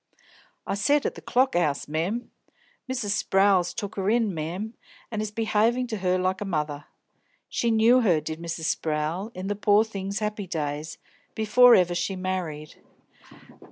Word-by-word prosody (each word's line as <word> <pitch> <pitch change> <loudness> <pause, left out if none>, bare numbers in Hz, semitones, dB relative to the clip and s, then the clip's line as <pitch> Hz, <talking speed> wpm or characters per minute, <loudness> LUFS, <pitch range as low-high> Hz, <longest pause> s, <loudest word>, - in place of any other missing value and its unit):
"I - - -2
said 285 +9 +2
at - - 0
the - - -11
Clock 260 -2 +1
'Ouse, 155 -5 0
mem. 175 +11 -2 0.6
Mrs. 240 -6 -2
Sprowl's 195 -3 +3
took 205 -1 -6
her 195 +1 0
in, 225 -3 +2
mem, 175 +8 -4 0.4
and 215 -2 -2
is 215 - -3
be'avin' 225 +3 +1
to 220 - -3
her 185 -1 +1
like 185 +1 -1
a - - 0
mother. 150 -6 -3 0.6
She 235 - 0
knew 230 +3 +5
her, 180 -9 +3
did 155 +1 -6
Mrs. 165 -1 -5
Sprowl, 160 +6 -2
in 185 +1 -5
the 205 +1 -1
pore 205 +1 +3
thing's 200 -2 -4
'appy 210 -2 -3
days, 150 -2 -4 0.4
before 240 +3 +6
ever 180 -1 +3
she 175 +3 -2
married. 180 -5 -4
195 Hz, 160 wpm, -26 LUFS, 170-220 Hz, 0.6 s, before